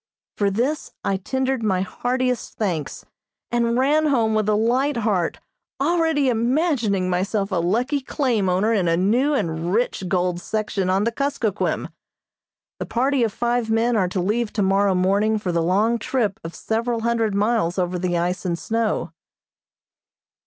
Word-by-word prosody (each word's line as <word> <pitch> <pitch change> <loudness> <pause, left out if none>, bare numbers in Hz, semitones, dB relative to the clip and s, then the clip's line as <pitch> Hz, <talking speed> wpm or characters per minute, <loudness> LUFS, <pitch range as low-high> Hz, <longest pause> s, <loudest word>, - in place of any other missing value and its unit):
For 200 -1 +1
this 250 +10 -2
I 195 - 0
tendered 260 +5 -1
my 190 -4 +1
heartiest 250 +5 -2
thanks, 175 -9 -3 0.5
and 235 0 +1
ran 300 +4 +3
home 230 -6 +2
with 215 -1 +1
a 210 - +3
light 250 +6 +1
heart, 205 -7 0 0.4
already 320 -1 +2
imagining 235 - +1
myself 195 +3 -1
a 185 - 0
lucky 235 - +1
claim 245 -8 0
owner 195 +5 +2
in 190 -5 +1
a 165 0 +2
new 245 +11 +2
and 165 -6 -2
rich 220 -2 0
gold 180 -1 0
section 210 -2 -2
on 190 +2 +2
the 230 - +1
Kuskokquim. 235 -6 -1 0.9
The - - -3
party 265 +2 +1
of 225 - +1
five 240 +1 -1
men 230 +2 +2
are 190 -4 +2
to 185 - -2
leave 210 +5 0
tomorrow 195 -1 +2
morning 200 +4 +2
for 195 -4 -2
the 170 -1 +1
long 210 +7 +2
trip 225 -7 -1
of 165 +1 -7
several 230 +1 -2
hundred 230 -3 0
miles 205 -4 +1
over 180 -1 -1
the 175 -1 0
ice 175 +2 -1
and 175 -2 -1
snow. 225 +7 -1
220 Hz, 160 wpm, -22 LUFS, 185-245 Hz, 0.9 s, ran